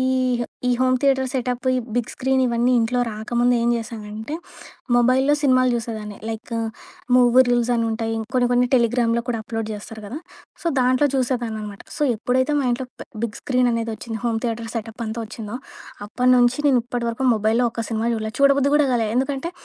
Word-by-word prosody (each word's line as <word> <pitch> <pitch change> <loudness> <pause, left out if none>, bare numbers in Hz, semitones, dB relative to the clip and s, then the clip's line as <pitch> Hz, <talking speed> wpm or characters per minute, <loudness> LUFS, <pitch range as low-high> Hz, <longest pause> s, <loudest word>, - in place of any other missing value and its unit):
ఈ - - +1 0.7
ఈ - - +3
home 255 0 +3
theatre 265 -2 +2
setup 250 -1 -2
ఈ - - +1 0.2
బిగ్ 240 -2 -1
స్క్రీన్ 265 0 +1
ఇవన్నీ 240 +1 +2
ఇంట్లో 235 +2 +1
రాకముందు 240 +3 0
ఏం 235 - +1
జేశానంటే 220 +2 -6 0.6
మొబైల్‌లో 255 +4 +4
సినిమాలు 255 -2 +4
చూసేదాన్ని. 220 -3 -5
లైక్ 225 +2 -6 0.6
మూవీ 250 0 +6
రూల్స్ 240 0 +2
అని 230 - +1
ఉంటాయి. 225 0 -2 0.2
కొన్ని, 250 -1 +3
కొన్ని 245 0 +3
టెలిగ్రామ్‌లో 235 -1 +2
కూడా 235 - -1
అప్లోడ్ 225 -1 -4
చేస్తారు 215 +1 -9
గదా! 260 +9 -6 0.4
సో - - -5
దాంట్లో 255 +3 +3
చూసేదాన్ననమాట. 230 -6 -2 0.2
సో - - -2
ఎప్పుడైతే 260 +6 +1
మా 275 - 0
ఇంట్లో 255 +1 -3
ప్ - - -6 0.2
big 225 -3 -3
screen 250 -2 +2
అనేదొచ్చిందో, 225 0 -3
home 230 -1 +1
theatre 230 -1 -2
setup 225 +1 -5
అంతా 220 +2 -4
ఒచ్చిందో 225 0 -7 0.5
అప్పట్నుంచి 250 +2 +3
నేను 255 -3 +4
ఇప్పటి 245 -1 -3
వరకు 260 +3 -2
మొబైల్‌లో 220 +3 +2
ఒక్క 230 - -3
సినిమా 225 0 -1
జూడలే. 220 -1 -3
చూడబుద్ది 280 0 +4
కూడా 295 -2 +3
కాలే. 230 -3 +1
ఎందుకంటే 270 +5 -1
240 Hz, 170 wpm, -22 LUFS, 225-255 Hz, 0.7 s, మూవీ